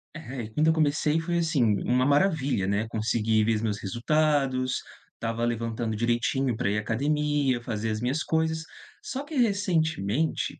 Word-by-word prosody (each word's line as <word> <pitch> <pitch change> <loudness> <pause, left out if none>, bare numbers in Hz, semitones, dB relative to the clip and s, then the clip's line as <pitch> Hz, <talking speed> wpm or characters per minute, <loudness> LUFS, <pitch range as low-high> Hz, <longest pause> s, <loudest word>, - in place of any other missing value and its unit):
é 135 -7 -6
quando 150 +8 +1
eu 160 - +5
comecei 150 0 +1
foi 170 +1 -1
assim, 165 -6 +1 0.2
uma 125 +2 +2
maravilha, 145 - +2
né, 100 +3 0
consegui 110 0 +1
ver 115 +1 +2
os 105 - -2
meus 105 -3 -1
resultados, 130 +3 +1 0.3
estava 115 +1 -2
levantando 115 -1 -2
direitinho 120 +3 0
pra 105 -4 0
ir 105 - 0
à - - 0
academia, 145 +2 0
fazer 115 -2 -3
as 110 0 -3
minhas 130 +6 0
coisas. 160 0 0 0.4
Só 275 -10 -4
que 300 +1 -8
recentemente, 160 - 0
130 Hz, 160 wpm, -27 LUFS, 115-155 Hz, 0.4 s, eu